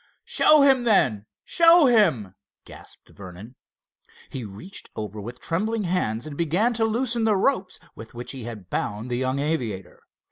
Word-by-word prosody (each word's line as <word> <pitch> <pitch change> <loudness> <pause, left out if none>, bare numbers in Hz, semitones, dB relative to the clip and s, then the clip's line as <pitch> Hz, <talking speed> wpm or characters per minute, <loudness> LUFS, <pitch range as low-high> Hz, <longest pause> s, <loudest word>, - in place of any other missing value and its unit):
"Show 305 -2 +4
him, 265 -3 +4
then! 125 - +1 0.2
show 335 -1 +5
him!" 170 - +2 0.3
gasped - - -14
Vernon. 100 +5 -12 0.8
He 130 - -6
reached 110 - -10
over 105 -1 -6
with 120 +4 -9
trembling 215 +6 -2
hands 145 - -2
and 155 -2 -8
began 175 +10 0
to 225 -1 0
loosen 235 +1 0
the 215 -2 +2
ropes 190 -4 -1 0.2
with 115 +1 -12
which 120 +1 -7
he 130 -4 -8
had 110 -6 -9
bound 105 +4 -3
the 120 - -1
young 130 +1 -1
aviator. 125 - -4
150 Hz, 155 wpm, -24 LUFS, -, 0.8 s, show